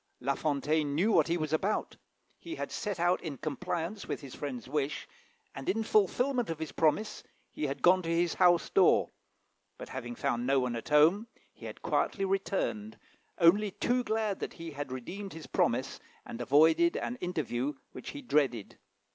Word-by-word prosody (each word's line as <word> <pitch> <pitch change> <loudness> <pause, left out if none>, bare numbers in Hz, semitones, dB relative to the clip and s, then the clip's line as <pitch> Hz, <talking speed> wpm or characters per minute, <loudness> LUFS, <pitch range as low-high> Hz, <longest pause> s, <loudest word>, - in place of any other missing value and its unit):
La 135 +2 0
Fontaine 145 +1 0
knew 195 +9 +2
what 160 -7 +4
he 170 +1 +1
was 155 -2 -3
about. 195 +7 0 0.4
He 335 0 -7
had - - -5
set 205 -5 -3
out 175 +1 +2
in 150 -5 -5
compliance 165 - -4
with - - -3
his 135 -3 -10
friend's 130 -5 -6
wish, 145 +1 -2 0.5
and, 135 +4 -5
in 220 +4 +1
fulfilment 240 +4 +2
of 165 - -3
his 160 -1 -5
promise, 185 +7 +1 0.3
he 150 - -2
had 140 0 -5
gone 185 +1 +6
to 165 - -5
his 170 0 +1
house 175 -2 +3
door; - - +4 0.7
but, - - -9
having 120 -2 -6
found 120 +1 -1
no 135 0 +4
one 125 -2 -1
at 115 - -6
home, 160 +9 +5 0.3
he - - -10
had - - -10
quietly 195 - 0
returned, 200 +2 -2 0.4
only 195 +5 +5
too 245 +6 0
glad 220 -3 -1
that - - -4
he 165 -1 -8
had 145 -2 -6
redeemed 185 +11 -6
his 160 -1 -9
promise, - - 0 0.3
and 115 - -7
avoided 160 - +4
an 240 - -3
interview 145 - -2 0.2
which - - -8
he 290 -1 -8
dreaded. 135 - 0
165 Hz, 180 wpm, -30 LUFS, 140-200 Hz, 0.7 s, gone